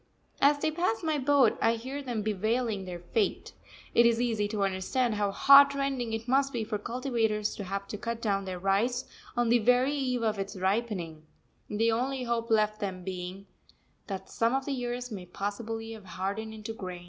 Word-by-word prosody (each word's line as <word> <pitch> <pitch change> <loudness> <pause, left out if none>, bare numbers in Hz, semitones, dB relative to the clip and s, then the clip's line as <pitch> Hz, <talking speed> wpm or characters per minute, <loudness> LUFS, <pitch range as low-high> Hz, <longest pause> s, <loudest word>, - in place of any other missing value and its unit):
As 285 +1 +5
they 310 +2 0
pass 360 +6 -1
my 310 -2 +1
boat 270 -3 +4
I 230 +1 +3
hear 260 +5 -5
them 240 -6 -3
bewailing 215 0 -1
their 180 -1 -5
fate. 180 +5 -1 0.4
It 235 - +6
is 230 -1 +2
easy 225 -4 +1
to 205 -1 -1
understand 195 +6 0
how 205 -1 0
heart 280 +7 +7
rending 270 -4 -1
it 225 +1 -4
must 270 +2 +3
be 235 -4 -2
for 210 -1 -3
cultivators 230 -3 -1
to 200 - -5
have 195 +1 -4
to 210 - -5
cut 235 0 -3
down 200 -3 0
their 185 -1 -4
rice 215 +8 +1 0.3
on 240 -1 +2
the 240 +1 +5
very 250 +5 +3
eve 255 -4 -1
of 215 -2 0
its 195 +1 -4
ripening, 185 -6 -2 0.4
the 225 +2 +1
only 255 +3 -1
hope 235 -1 -1
left 215 -1 +2
them 185 -3 -4
being 185 +1 -6 0.6
that 190 -1 -5
some 230 +3 +1
of 270 0 -1
the 280 - -1
ears 245 0 -4
may 185 -4 -6
possibly 225 +4 -4
have 220 -3 -10
hardened 200 +4 -4
into 220 +1 -6
grain. 185 -4 -6
225 Hz, 195 wpm, -29 LUFS, 200-250 Hz, 0.6 s, heart